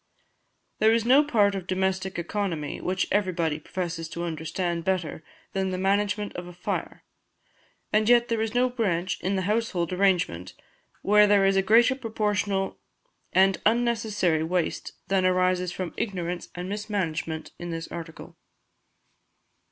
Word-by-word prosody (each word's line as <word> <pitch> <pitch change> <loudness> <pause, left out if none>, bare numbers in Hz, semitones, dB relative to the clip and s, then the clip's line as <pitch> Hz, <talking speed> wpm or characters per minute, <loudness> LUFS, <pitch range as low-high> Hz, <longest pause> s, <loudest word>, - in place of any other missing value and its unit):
There 220 +1 +5
is 230 0 +2
no 265 +5 +6
part 210 -9 +3
of 190 -2 -5
domestic 190 0 -1
economy 170 -4 -3
which 185 +1 -1
everybody 170 -6 0
professes 165 0 -4
to 170 - -5
understand 170 +1 -3
better 175 -4 -2 0.3
than 190 -1 0
the 185 - -2
management 205 +2 0
of 175 0 -6
a 180 - -10
fire, 175 - -4 0.9
and 215 +1 +3
yet 240 0 +5
there 230 -1 0
is 225 +1 -2
no 250 +1 +4
branch 185 -8 -1
in 190 +2 0
the 190 - -1
household 195 -4 -1
arrangement 180 - +1 0.5
where 210 +1 +6
there 200 -1 +4
is 195 0 +3
a 195 - +4
greater 230 +6 +5
proportional 210 -5 -1 0.5
and 190 0 +3
unnecessary 220 -7 +1
waste 175 +1 -2
than 195 -1 +2
arises 185 -1 +2
from 180 -1 -5
ignorance 180 -4 -3
and 180 +1 -5
mismanagement 190 -6 -3
in 175 - -6
this 165 -1 -4
article. 165 -1 -8
190 Hz, 145 wpm, -26 LUFS, 175-210 Hz, 0.9 s, no